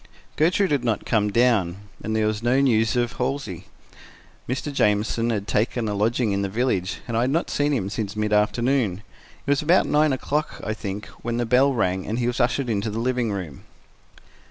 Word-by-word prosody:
Gertrude 180 +5 +2
had 140 -4 +1
not 115 -4 -1
come 105 -2 +1
down, 105 -6 +2 0.3
and 110 - -2
there 110 -1 +2
was 105 0 -1
no 120 +3 +2
news 115 -4 +2
of 120 +1 -1
Halsey. 125 -9 -3 0.8
Mr. 135 +3 -3
Jamieson 110 0 +1
had 105 -3 -2
taken 115 +2 0
a 105 - -1
lodging 110 +2 +1
in 100 0 0
the 100 - -1
village, 100 -4 -1
and 115 - -3
I 115 - +2
had 125 - +1
not 165 +5 0
seen 145 0 +1
him 115 -9 0
since 105 0 -4
mid 105 0 -1
afternoon. 105 -1 +1 0.4
It - - 0
was 145 - +2
about 170 +4 +4
nine 150 0 +3
o'clock, 145 +3 -2
I 110 - -2
think, 105 -2 -5 0.2
when 120 0 -2
the 120 - 0
bell 130 +4 +4
rang 95 -7 -1
and 110 - -2
he 120 - 0
was 120 +1 -1
ushered 125 +2 +1
into 110 -1 -1
the 105 - -4
living 120 -1 0
room. 90 -8 -5
115 Hz, 205 wpm, -23 LUFS, 105-130 Hz, 0.8 s, about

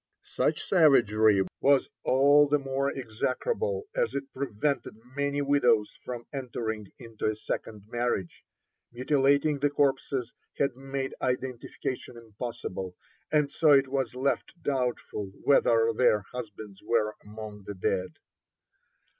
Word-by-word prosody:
Such - - -1
savagery 110 - +5 0.2
was 140 -1 +4 0.2
all 145 +3 +5
the 150 - +4
more 135 0 -1
execrable 140 - -2
as - - 0
it 275 - -4
prevented 135 0 -2 0.2
many 140 0 0
widows 125 -7 +3
from 120 -2 -6
entering 115 -5 -4
into 115 -3 -5
a 110 - 0
second 105 -1 -5
marriage. 120 -6 -2 0.5
Mutilating 140 +3 +2
the 145 +1 +2
corpses 135 -3 0 0.2
had 140 -3 +1
made 135 0 -4
identification 125 -1 -3
impossible, 110 -5 -6 0.4
and 150 -2 +2
so 150 0 +5
it 135 -1 +4
was 130 -2 -1
left 140 +6 -1
doubtful 125 -6 -2 0.2
whether 115 -4 +4
their 110 -2 +3
husbands 105 -4 -8
were 110 -2 +1
among 105 -1 -9
the 100 - -5
dead. 90 0 -1
125 Hz, 120 wpm, -28 LUFS, 110-140 Hz, 0.5 s, savagery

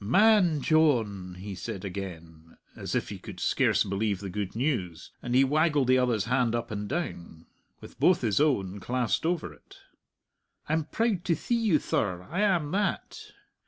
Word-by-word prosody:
"Man 180 - +4
Dyohn!" 115 - +1
he 100 +2 -7
said 90 +2 -6
again, 85 -4 -8 0.2
as - - -5
if - - -1
he - - -7
could - - -10
scarce - - +2
believe 100 0 -1
the 100 -2 -6
good 100 0 -4
news, 105 - -2
and 120 +1 -2
he 135 - +6
waggled 145 -1 +2
the 130 0 +5
other's 120 -5 +1
hand 125 -1 +1
up 120 - -4
and 105 -1 -4
down, 85 - -5 0.4
with - - -13
both 180 - +4
his 115 +2 +1
own 100 -10 +1
clasped 125 - -1
over 165 - -2
it. - - -19 0.9
"I'm 155 0 0
proud 220 -4 -1
to 170 - +2
thee 240 - -3
you, 225 -8 +3
thir; 90 -9 -2
I 175 - -2
am 175 -8 +1
that. 200 +1 -2
120 Hz, 170 wpm, -28 LUFS, 95-155 Hz, 0.9 s, he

